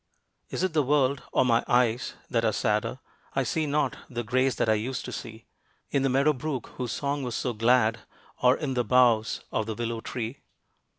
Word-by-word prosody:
Is -, -, -3 dB
it 185 Hz, -3 st, 0 dB
the 155 Hz, -, +3 dB
world, 140 Hz, -1 st, +2 dB
or -, -, +3 dB
my 115 Hz, -1 st, +3 dB
eyes, 120 Hz, 0 st, +2 dB
that 115 Hz, -2 st, 0 dB
are 110 Hz, -, +3 dB
sadder? 110 Hz, +2 st, 0 dB, 0.4 s
I 135 Hz, -, +2 dB
see 155 Hz, +5 st, -1 dB
not 145 Hz, -2 st, 0 dB
the 120 Hz, -1 st, -3 dB
grace 130 Hz, +3 st, +1 dB
that -, -, 0 dB
I 110 Hz, -, +5 dB
used 120 Hz, +4 st, -2 dB
to -, -, -6 dB
see 110 Hz, 0 st, -8 dB, 0.5 s
In 140 Hz, -, +2 dB
the 135 Hz, -, +2 dB
meadow 140 Hz, +4 st, +3 dB
brook 135 Hz, -2 st, -4 dB
whose 125 Hz, -2 st, -3 dB
song 140 Hz, 0 st, -2 dB
was 125 Hz, -3 st, -3 dB
so 125 Hz, -, -1 dB
glad, 115 Hz, 0 st, +3 dB, 0.4 s
or 125 Hz, +1 st, +5 dB
In 145 Hz, -4 st, -2 dB
the 125 Hz, -1 st, +1 dB
boughs 115 Hz, -2 st, +3 dB
of 110 Hz, -1 st, -1 dB
the 110 Hz, -, -3 dB
willow 115 Hz, 0 st, -3 dB
tree. 120 Hz, +3 st, -5 dB
125 Hz, 200 wpm, -27 LUFS, 115-135 Hz, 0.5 s, I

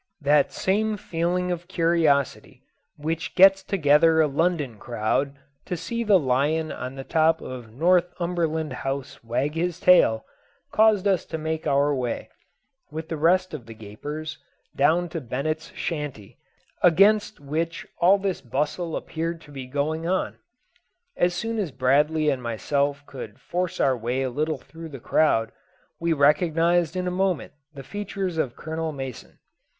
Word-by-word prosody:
That 145 Hz, 0 st, +3 dB
same 215 Hz, +3 st, 0 dB
feeling 180 Hz, 0 st, -1 dB
of 175 Hz, 0 st, -4 dB
curiosity 165 Hz, -6 st, +1 dB, 0.3 s
which 160 Hz, +2 st, -3 dB
gets 195 Hz, +1 st, +7 dB
together 160 Hz, -3 st, +4 dB
a 160 Hz, -, +6 dB
London 150 Hz, -, 0 dB
crowd 120 Hz, +4 st, -1 dB, 0.3 s
to 180 Hz, -, -2 dB
see 235 Hz, +7 st, -3 dB
the 210 Hz, -3 st, +5 dB
lion 150 Hz, +3 st, +1 dB
on 130 Hz, +1 st, -6 dB
the 135 Hz, -, -6 dB
top 160 Hz, +2 st, +2 dB
of 125 Hz, -4 st, -8 dB
Northumberland 170 Hz, 0 st, +1 dB
House 135 Hz, -2 st, -4 dB
wag 130 Hz, +6 st, -1 dB
his 175 Hz, +1 st, -2 dB
tail, 180 Hz, -, +5 dB, 0.5 s
caused 215 Hz, -2 st, +4 dB
us 190 Hz, -4 st, +2 dB
to -, -, -5 dB
make 160 Hz, 0 st, -3 dB
our 145 Hz, +1 st, +3 dB
way, 125 Hz, -3 st, -3 dB, 0.6 s
with 160 Hz, +1 st, -6 dB
the 165 Hz, -, -2 dB
rest 180 Hz, +4 st, +2 dB
of 125 Hz, -7 st, -7 dB
the 115 Hz, -, -9 dB
gapers, 145 Hz, +9 st, -7 dB, 0.4 s
down 175 Hz, +2 st, +3 dB
to 165 Hz, -1 st, -4 dB
Bennett's 150 Hz, +6 st, -3 dB
shanty, 145 Hz, -, -5 dB, 0.4 s
against 205 Hz, +5 st, +4 dB
which 160 Hz, +4 st, -3 dB
all 185 Hz, +4 st, +6 dB
this 195 Hz, -2 st, -2 dB
bustle 150 Hz, +6 st, -2 dB
appeared 165 Hz, +1 st, -3 dB
to 145 Hz, -, -15 dB
be 135 Hz, -2 st, -7 dB
going 155 Hz, +5 st, -2 dB
on. 185 Hz, +1 st, -1 dB, 0.8 s
As 175 Hz, 0 st, +1 dB
soon 225 Hz, +2 st, -2 dB
as 185 Hz, -8 st, -2 dB
Bradley 150 Hz, +5 st, +2 dB
and 130 Hz, -2 st, -2 dB
myself 140 Hz, +5 st, -1 dB
could 115 Hz, -7 st, -9 dB
force 180 Hz, 0 st, -3 dB
our 130 Hz, -, +3 dB
way 125 Hz, +3 st, -2 dB
a 130 Hz, -, -2 dB
little 155 Hz, +3 st, -1 dB
through 165 Hz, +5 st, -11 dB
the 135 Hz, -3 st, -8 dB
crowd, 115 Hz, -4 st, +2 dB, 0.5 s
we 170 Hz, 0 st, 0 dB
recognised 165 Hz, +3 st, +3 dB
in 180 Hz, 0 st, -1 dB
a -, -, 0 dB
moment 185 Hz, -3 st, -1 dB, 0.2 s
the 135 Hz, -, -8 dB
features 190 Hz, 0 st, -4 dB
of 130 Hz, -6 st, -1 dB
Colonel 160 Hz, 0 st, -4 dB
Mason. 135 Hz, -4 st, -8 dB
160 Hz, 150 wpm, -25 LUFS, 140-175 Hz, 0.8 s, gets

